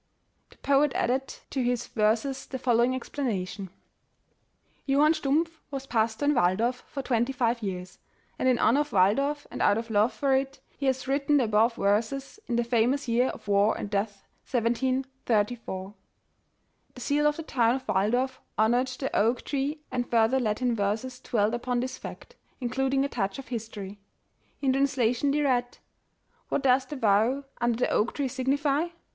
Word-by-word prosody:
The - - -20
poet 280 0 +2
added 265 +3 0 0.2
to 270 - -1
his 245 -1 0
verses 225 +5 0
the 260 - -4
following 245 +1 +2
explana 235 -9 -3
tion: 190 0 -7 1.2
''Johann 290 +3 +4
Stumpf 320 +3 0
was 270 -2 -5
pastor 230 +1 0
in 295 - +4
Walldorf 230 +4 +1
for 275 - -5
twenty 240 0 +1
five 240 -2 0
years, 185 -3 -5 0.4
and 260 - +3
in 250 - +3
honor 260 +5 +3
of 295 - 0
Walldorf, 275 +10 +2
and - - -5
out 205 - +4
of 225 0 -4
love 215 +3 +3
for 275 -2 +1
it, 270 +1 -2 0.2
he 275 - -2
has 260 -1 0
written 280 +2 +2
the 265 - +3
above 225 +1 +2
verses 235 - -1
in 240 - -1
the 240 - +2
famous 245 +4 +1
year 240 +2 +2
of - - -7
war 200 +1 +3
and 205 - -5
death 200 0 -2 0.2
1734." 240 -5 -1 1.0
The - - -10
seal 295 +1 +2
of 295 - +1
the 325 - -5
town 240 -5 +2
of 265 - -7
Waldorf 245 +7 0 0.2
honored 240 +4 +3
the 260 +1 -4
oak 230 +4 +2
tree, 290 +2 -2
and 245 -1 -2
further 230 +3 +3
Latin 240 +1 0
verses 225 +5 -2
dwelt 215 -3 0
upon 245 +1 -1
this 255 +1 -4
fact, 485 - -10 0.2
in 245 -2 -3
eluding 270 +1 +1
a - - 0
touch 200 -7 -2
of 275 - -9
history. 210 -4 -6 0.6
In 270 -2 +2
translation 265 -1 +1
they 295 +2 +1
read: 245 -3 +1
'^ - - -20 0.7
'What - - -1
does 260 0 +3
the 295 - -6
vow 230 +3 +2 0.2
under 240 -1 +1
the 250 - +1
oak 220 - +1
tree 280 -2 0
signify'? 280 +4 0
250 Hz, 175 wpm, -27 LUFS, 225-270 Hz, 1.2 s, Johann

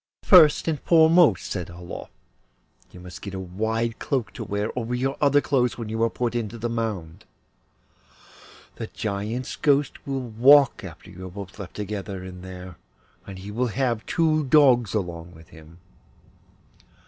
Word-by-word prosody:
'First 165 -6 +6
and 155 -3 0
foremost,' 160 - +4
said 90 -2 -4
Olof, 85 0 -9 0.8
'you 90 - -14
must 90 0 -11
get 100 -2 -7
a - - -4
wide 110 +5 -2
cloak 130 -5 -2
to - - -6
wear 105 +2 -3
over 125 0 -2
your 135 +2 -1
other 145 0 +4
clothes, 125 -5 0
when 115 -3 -6
you 110 +1 -3
are 115 - +3
put 120 -1 -2
into 115 -1 -3
the 115 +1 -3
mound. 105 -9 -4 1.5
The - - -5
Giant's 110 +4 -4
ghost 145 -1 0
will 135 -1 -2
walk 125 +4 +4
after 85 0 -11
you 95 0 -9
are - - -8
both 100 +2 -10
left 100 - -9
together 100 -2 -5
in 90 -1 -9
there, 90 -2 -10 0.5
and 95 -1 -8
he 100 +2 -8
will 125 +4 -1
have 120 -1 -1
two 155 -2 +1
dogs 130 -6 +4
along 85 -4 -4
with 80 0 -16
him. 80 0 -15
110 Hz, 160 wpm, -24 LUFS, 95-130 Hz, 1.5 s, First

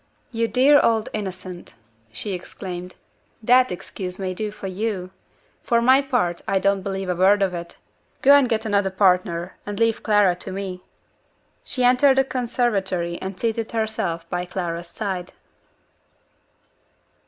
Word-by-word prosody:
"You 230 -1 0
dear 270 +5 +5
old 225 -1 +2
innocent!" 185 - -6 0.4
she 190 - -5
exclaimed, 180 0 -7 0.5
"that 250 +2 +5
excuse 180 0 -6
may 185 -1 -3
do 210 +3 -3
for 205 -1 -10
you. 190 -1 -3 0.5
For 235 -2 +2
my 260 +3 +5
part, 245 -11 -1
I 195 - +2
don't 195 0 +1
believe 195 0 -4
a 180 - +1
word 195 +3 +4
of 190 -2 0
it. 170 -1 -7 0.5
Go 275 - +7
and 280 -3 +5
get 225 -1 0
another 200 -2 +1
partner, 180 -2 +1
and 205 -1 -6
leave 230 -1 +2
Clara 205 -4 +3
to 185 - -6
me." 185 -1 -5 0.8
She 255 - -1
entered 255 +2 +5
the 270 - +5
conservatory 205 -9 -1
and 190 0 -6
seated 230 -1 -2
herself 205 -7 -2
by 175 +1 -2
Clara's 175 -2 -4
side. 185 -2 -5
195 Hz, 145 wpm, -23 LUFS, 180-230 Hz, 0.8 s, Go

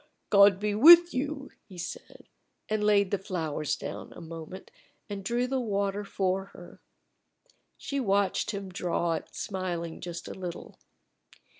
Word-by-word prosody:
"God 200 -1 +7
be 210 0 -1
with 340 +9 +8
you!" 280 +1 -3 0.2
he 185 - -12
said, 325 - -8 0.4
and 215 -1 -1
laid 200 -2 +3
the 200 - 0
flowers 160 -6 -2
down - - -7
a - - -11
moment 165 +3 -9 0.4
and 200 -2 -6
drew 240 +4 0
the 260 +1 -1
water 200 -3 -1
for 190 -1 -1
her. - - -14 1.0
She 280 - -3
watched 200 -5 +1
him 200 -2 -4
draw 175 -2 -1
it, 160 - -6
smiling 175 -5 -4
just 175 -1 -6
a - - -6
little. 180 -3 -8
195 Hz, 145 wpm, -28 LUFS, 180-215 Hz, 1.0 s, with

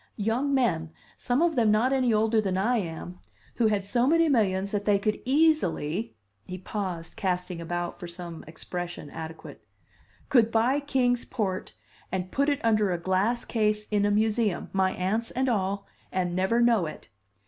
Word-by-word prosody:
young 230 +7 0
men, 175 - +1 0.2
some 250 +6 0
of 340 -2 +2
them 230 -4 +3
not 225 +5 +3
any 255 -3 +2
older 220 +1 +3
than 190 -3 -1
I 235 +6 +2
am, 175 -1 -5 0.4
who 230 - +3
had 205 -2 0
so 240 +5 +1
many 330 +2 +4
millions 200 -6 +1
that 205 -1 -2
they 205 -1 +4
could 210 +2 -1
easily 245 - +1 0.2
" 100 0 -46
he 185 - -5
paused, 185 -3 -5
casting 180 -2 -2
about 175 +1 -4
for 175 - -6
some 170 -1 -8
expression 175 -1 -6
adequate 160 0 -9 0.6
"could 235 -4 +4
buy 235 +5 +2
Kings 250 -4 +1
Port 195 -6 -3 0.4
and 185 0 -3
put 280 +2 +1
it 285 - +1
under 215 -3 +3
a 175 - 0
glass 190 +7 0
case 210 -2 0
in 205 -1 +2
a 205 - +3
museum 215 -1 +1
my 190 -1 +2
aunts 215 +6 -1
and 260 +1 -1
all 200 -3 0 0.3
and 180 -2 -1
never 190 +6 +2
know 230 -8 +3
it!" 155 - -10
210 Hz, 175 wpm, -27 LUFS, 180-240 Hz, 0.6 s, many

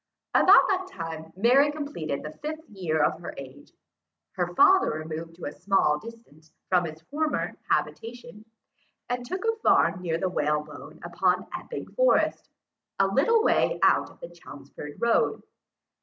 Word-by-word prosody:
About - - +7
the 375 -1 -1
time 165 -2 -5
that 165 +2 -22
Mary 260 +8 +4
completed 285 - -5
the 150 0 -8
fifth 310 +1 -6
year 175 -7 -1
of - - +1
her 170 - -8
age, 140 +1 -11 0.6
her - - -2
father 380 0 +5
removed 160 +1 -6
to 175 - -9
a - - -4
small 185 -4 +1
distance 165 -8 -14 0.2
from 180 -2 +3
his 155 -1 -7
former 305 - -2
habitation, 235 -1 -3 0.7
and 245 0 -2
took 370 - -5
a 450 0 +1
farm 185 - +3
near 165 -2 -1
the 185 - -1
Whalebone 150 -4 -3
upon - - 0
Epping - - -6
Forest, - - +2 0.5
a 195 - +4
little 295 - +3
way - - +2
out - - +4
of - - -19
the 170 - -8
Chelmsford 145 -3 -11
road. 235 0 +1
190 Hz, 155 wpm, -26 LUFS, -, 0.7 s, About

